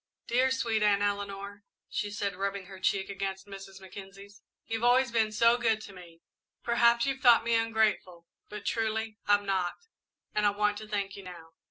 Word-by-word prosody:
"Dear, 255 Hz, +2 st, +2 dB
sweet 235 Hz, -5 st, 0 dB
Aunt 205 Hz, -1 st, +3 dB
Eleanor," 200 Hz, 0 st, -3 dB, 0.2 s
she 205 Hz, -, -3 dB
said, 205 Hz, -1 st, -3 dB
rubbing 195 Hz, 0 st, -3 dB
her 190 Hz, 0 st, -11 dB
cheek 190 Hz, +1 st, 0 dB
against 195 Hz, -1 st, -4 dB
Mrs. 195 Hz, -1 st, -10 dB
Mackenzie's, 195 Hz, +2 st, -12 dB, 0.2 s
"you've 225 Hz, 0 st, -3 dB
always 250 Hz, +1 st, +4 dB
been 220 Hz, -2 st, +2 dB
so 230 Hz, +2 st, +4 dB
good 225 Hz, -2 st, +2 dB
to 200 Hz, -, -10 dB
me. 170 Hz, -3 st, -14 dB, 0.4 s
Perhaps 235 Hz, 0 st, +4 dB
you've 270 Hz, -1 st, -1 dB
thought 240 Hz, -4 st, +6 dB
me 235 Hz, 0 st, 0 dB
ungrateful, 220 Hz, -6 st, +1 dB, 0.2 s
but 210 Hz, -1 st, -8 dB
truly 220 Hz, -1 st, -1 dB
I'm 205 Hz, 0 st, +4 dB
not, 190 Hz, -3 st, 0 dB, 0.6 s
and 210 Hz, 0 st, +2 dB
I -, -, +6 dB
want 205 Hz, 0 st, 0 dB
to 215 Hz, -, -9 dB
thank 200 Hz, -2 st, -3 dB
you 200 Hz, -, -9 dB
now." 175 Hz, -3 st, -11 dB
205 Hz, 180 wpm, -29 LUFS, 195-225 Hz, 0.6 s, thought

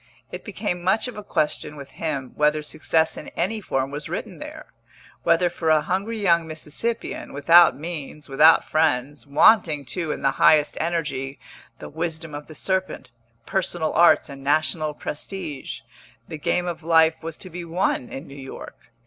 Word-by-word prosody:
It -, -, -7 dB
became 180 Hz, -5 st, -3 dB
much 190 Hz, +7 st, +1 dB
of 250 Hz, -, -7 dB
a 210 Hz, -, -6 dB
question 150 Hz, -5 st, -1 dB
with 140 Hz, -2 st, -10 dB
him 140 Hz, -5 st, -3 dB
whether 150 Hz, 0 st, +2 dB
success 160 Hz, +1 st, 0 dB
in -, -, -8 dB
any 220 Hz, -1 st, 0 dB
form 135 Hz, -7 st, -2 dB
was 145 Hz, +1 st, -5 dB
written -, -, -5 dB
there; -, -, -8 dB, 0.6 s
whether 170 Hz, +2 st, +3 dB
for 170 Hz, -2 st, -2 dB
a 155 Hz, -1 st, +4 dB
hungry 200 Hz, +5 st, -2 dB
young 170 Hz, -5 st, +3 dB
Mississippian, 160 Hz, +9 st, -4 dB
without 165 Hz, +4 st, +6 dB
means, 150 Hz, -1 st, -6 dB
without 150 Hz, +4 st, +5 dB
friends, 145 Hz, -2 st, 0 dB
wanting, 150 Hz, -1 st, +4 dB
too, 165 Hz, +2 st, -3 dB
in -, -, -5 dB
the 135 Hz, -, +3 dB
highest 150 Hz, -1 st, +5 dB
energy, 150 Hz, -5 st, -2 dB, 0.4 s
the -, -, -9 dB
wisdom 160 Hz, 0 st, -4 dB
of 145 Hz, 0 st, -7 dB
the 155 Hz, -, -11 dB
serpent, 190 Hz, -6 st, -2 dB, 0.3 s
personal 175 Hz, -4 st, -1 dB
arts 170 Hz, 0 st, +5 dB
and 135 Hz, -1 st, -10 dB
national 155 Hz, +1 st, +1 dB
prestige, 150 Hz, -, -5 dB, 0.5 s
the 160 Hz, -, -7 dB
game 175 Hz, +3 st, 0 dB
of 170 Hz, -1 st, -4 dB
life 160 Hz, 0 st, +3 dB
was 165 Hz, -1 st, -6 dB
to 185 Hz, -, -9 dB
be 175 Hz, +1 st, -6 dB
won 170 Hz, -6 st, -1 dB
in 135 Hz, -, -7 dB
New 140 Hz, -, -11 dB
York. 135 Hz, -3 st, -10 dB
160 Hz, 165 wpm, -23 LUFS, 145-175 Hz, 0.6 s, without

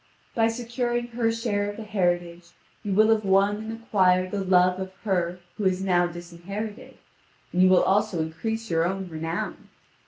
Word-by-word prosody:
By 225 Hz, -1 st, +3 dB
securing 240 Hz, +1 st, -2 dB
her 230 Hz, -1 st, 0 dB
share 215 Hz, -3 st, -1 dB
of 205 Hz, -, -7 dB
the 225 Hz, -, -6 dB
heritage, 175 Hz, -4 st, -1 dB, 0.3 s
you 205 Hz, -, -4 dB
will 215 Hz, +3 st, +4 dB
have 220 Hz, -1 st, +3 dB
won 195 Hz, +1 st, +3 dB
and 220 Hz, +1 st, -6 dB
acquired 185 Hz, -3 st, +3 dB
the 200 Hz, -1 st, -2 dB
love 185 Hz, 0 st, +3 dB
of 190 Hz, 0 st, -5 dB
her 180 Hz, -4 st, 0 dB, 0.2 s
who 210 Hz, -, -2 dB
is 185 Hz, 0 st, +1 dB
now 175 Hz, -2 st, +3 dB
disinherited, 175 Hz, +5 st, -7 dB, 0.6 s
and 180 Hz, -, +2 dB
you 185 Hz, -, +6 dB
will 185 Hz, -, +5 dB
also 205 Hz, -2 st, +1 dB
increase 220 Hz, +8 st, -3 dB
your 165 Hz, 0 st, +2 dB
own 190 Hz, +2 st, -2 dB
renown. 165 Hz, +1 st, -4 dB
195 Hz, 175 wpm, -25 LUFS, 175-220 Hz, 0.6 s, you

